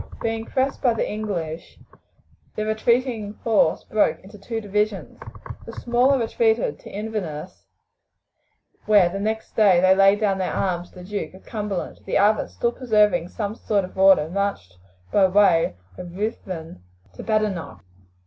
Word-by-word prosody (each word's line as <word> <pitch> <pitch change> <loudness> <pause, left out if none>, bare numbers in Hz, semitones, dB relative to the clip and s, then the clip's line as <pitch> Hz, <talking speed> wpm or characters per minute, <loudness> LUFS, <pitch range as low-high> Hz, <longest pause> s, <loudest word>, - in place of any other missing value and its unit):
Being 225 0 -2
pressed 265 +1 -1
by 245 -4 +2
the - - -1
English, 175 -7 -5 0.8
the 215 - -2
retreating 220 -1 0
force 210 -8 +2
broke 215 - +1
into 205 +2 -13
two 225 +3 -4
divisions. 210 -1 -2 0.5
The - - -8
smaller 250 +3 +2
retreated 225 - 0
to - - -12
Inverness, 190 -6 -6 1.2
where 205 -5 +5
they 195 +3 -5
next 220 +2 -3
day 200 -5 +5 0.2
laid 195 +1 +5
down 200 -3 +1
their 185 - -2
arms 180 -2 -2
to - - -24
the 180 - -10
Duke 200 -1 -5
of 190 - -16
Cumberland; 210 -4 -4
the - - +1
other, 210 +2 +3
still 235 - -1
preserving 210 -8 +2
some 205 0 -4
sort 205 -3 -1
of 185 - -14
order, 190 -5 +5
marched 195 - -3 0.4
by 195 -2 +5
way 185 - +3 0.2
of 175 0 -8
Ruthven 185 - -5 0.3
to - - -9
Badenoch. 215 -6 -2
205 Hz, 150 wpm, -23 LUFS, 185-220 Hz, 1.2 s, where